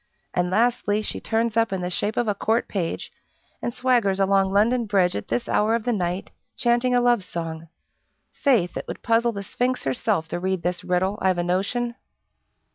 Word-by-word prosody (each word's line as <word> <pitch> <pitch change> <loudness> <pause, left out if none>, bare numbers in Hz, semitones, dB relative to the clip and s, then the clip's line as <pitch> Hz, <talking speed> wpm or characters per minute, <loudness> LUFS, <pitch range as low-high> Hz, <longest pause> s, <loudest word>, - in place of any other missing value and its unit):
And, 180 0 +1
lastly, 215 0 +1
she - - -3
turns 225 0 0
up 230 -2 +2
in 190 -1 -2
the 180 0 -3
shape 205 +4 -1
of 240 - +1
a 210 - +2
court 225 +4 0
page, 180 -5 -3 0.5
and 240 - -2
swaggers 240 -6 +1
along 195 0 +3
London 225 +4 +2
Bridge 190 -3 +2
at 100 - -4
this 120 +1 -1
hour 220 +2 +2
of 230 - -2
the 245 - 0
night, 180 -1 -2 0.3
chanting 240 +1 +2
a - - +5
love 240 -4 +3
song. 165 -2 -6 0.6
Faith! 230 - +1
it - - -5
would - - -7
puzzle 230 +1 +3
the 200 -2 -5
sphinx 250 +5 -1
herself 135 +4 0
to 175 - -3
read 185 -1 -1
this 180 +1 -2
riddle, 185 +3 0
I've 185 -1 +2
a 175 - 0
notion!" 200 +7 -1
200 Hz, 195 wpm, -24 LUFS, 180-235 Hz, 0.6 s, a